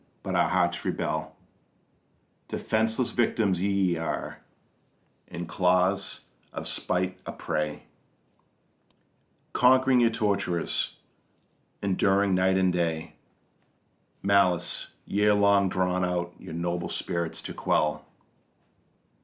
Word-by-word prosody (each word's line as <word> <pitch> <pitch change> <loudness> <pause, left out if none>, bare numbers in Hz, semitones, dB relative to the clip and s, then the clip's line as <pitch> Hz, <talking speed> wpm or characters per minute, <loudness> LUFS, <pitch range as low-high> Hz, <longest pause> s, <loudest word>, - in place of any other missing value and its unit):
but - - -3
our - - +3
hearts - - +1
rebel: 80 0 -2 1.1
Defenceless 110 +2 0
victims 110 -6 +1
ye 95 -3 +1
are, 80 -1 -4 0.9
in 85 0 -6
claws 90 +2 +1 0.3
of - - -5
spite 90 0 -1
a - - -3
prey, 75 -1 -3 1.7
Conquering 130 0 +5
your 120 -1 +5
torturers, 100 -6 -1 0.9
enduring 100 0 +2
night 95 +1 +3
and 95 -1 +2
day 80 -2 -1 1.1
Malice, 95 -3 +2
year 105 +1 +3
long 100 -1 +4
drawn 90 0 0
out 90 -1 -1
your 80 - -8
noble 85 +1 -2
spirits 85 -1 -3
to - - -5
quell. 75 0 0
95 Hz, 95 wpm, -27 LUFS, 85-100 Hz, 1.7 s, Conquering